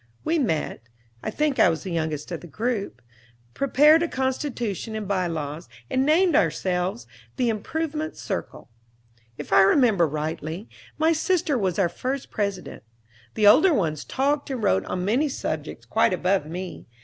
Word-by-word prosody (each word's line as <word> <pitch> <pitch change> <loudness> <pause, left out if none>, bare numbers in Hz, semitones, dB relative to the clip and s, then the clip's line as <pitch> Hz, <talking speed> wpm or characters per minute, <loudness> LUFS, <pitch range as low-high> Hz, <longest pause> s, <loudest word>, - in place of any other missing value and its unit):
We 325 +1 +1
met, 165 - -1 0.4
I - - -3
think 300 -3 0
I - - +6
was 165 -1 -2
the 190 - -5
youngest 155 -1 -3
of 170 - -4
the 175 - -10
group, 210 - -3 0.5
prepared 295 +4 +5
a 340 - +1
Constitution 250 - -3
and 215 -2 -4
By 185 -2 0
Laws, 155 -3 -5 0.2
and 260 - +2
named 335 +1 +4
ourselves 180 - 0 0.3
"The 245 -2 +1
Improvement 310 +8 -3
Circle." - - -5 0.7
If - - -5
I - - +8
remember 195 - +4
rightly, 155 +5 -4 0.3
my 320 +2 +3
sister 330 -1 +1
was 190 -7 0
our 195 -3 +3
first 255 +10 -4
president. 200 -4 -3 0.5
The 210 - +2
older 315 - +7
ones 155 - -1
talked 285 +2 -1
and 255 -5 -3
wrote 95 +1 +2
on 180 0 -3
many 255 +9 +2
subjects - - -5
quite - - +2
above 185 -3 +1
me. 180 +3 -7
205 Hz, 160 wpm, -24 LUFS, 170-280 Hz, 0.7 s, I